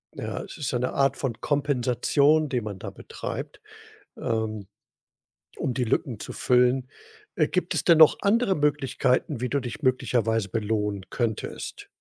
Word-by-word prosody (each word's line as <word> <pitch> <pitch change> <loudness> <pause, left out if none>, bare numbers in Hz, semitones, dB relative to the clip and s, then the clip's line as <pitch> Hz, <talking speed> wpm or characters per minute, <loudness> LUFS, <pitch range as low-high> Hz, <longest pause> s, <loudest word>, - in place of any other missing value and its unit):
Ja, - - -4
es - - -10
ist 145 - -2
ja 120 - 0
'ne 125 - -1
Art 135 0 +2
von 120 -5 -3
Kompensation, 145 +2 +2
die 125 -2 0
man 105 -3 -6
da - - -6
betreibt, - - -7 0.6
ähm, 110 -3 -2 0.9
um 125 - -1
die 125 - 0
Lücken 115 0 -1
zu - - -7
füllen. 125 +1 +2 0.5
Äh, - - +3
gibt 180 -1 -1
es - - 0
denn 170 -2 +5
noch 155 -1 +8
andere 205 -1 +2
Möglichkeiten, 135 -5 +1
wie 125 - -1
du 140 - +1
dich 120 +3 -6
möglicherweise 115 -5 +1
belohnen 105 -2 -1
könntest? 115 -4 -4
125 Hz, 155 wpm, -26 LUFS, 115-145 Hz, 0.9 s, noch